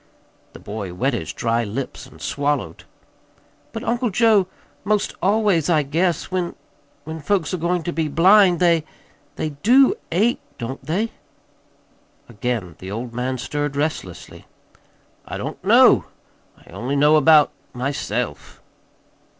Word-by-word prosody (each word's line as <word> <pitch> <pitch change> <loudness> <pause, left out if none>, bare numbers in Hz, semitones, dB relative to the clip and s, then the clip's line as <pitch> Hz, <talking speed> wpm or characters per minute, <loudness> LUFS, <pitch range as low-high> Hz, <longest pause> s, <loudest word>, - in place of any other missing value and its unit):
The - - -11
boy 100 -4 -6
wet 130 +9 0
his 90 -10 -3
dry 115 0 0
lips 115 +5 -5
and - - -17
swallowed. 140 - -2 0.9
"But, 225 - -6
Uncle 235 +1 0
Joe, 215 -2 +3 0.4
'most 210 0 0
always, 195 -5 +2
I 155 -3 +3
guess, 165 +7 -1
when 180 -2 -2 0.5
when 160 +2 -7
folks 180 +1 -1
are 185 - -2
going 175 +1 0
to 175 - -3
be 160 -1 -1
blind, 180 +4 +5
they 170 -3 +3 0.5
they 155 - -2
DO 260 +5 +5 0.2
ache, 210 +8 +1 0.2
don't 120 +3 -6
they?" 200 +9 -1 1.2
Again 115 -7 -4
the 95 - -8
old 115 +4 -5
man 125 +2 -2
stirred 145 +2 -3
restlessly. 145 - -4 0.8
"I - - -5
don't - - -6
know. - - +6 0.6
I - - -17
only 130 +4 -3
know 150 +2 +5
about 155 0 +6 0.2
myself." 125 - -4
155 Hz, 135 wpm, -21 LUFS, 125-185 Hz, 1.2 s, know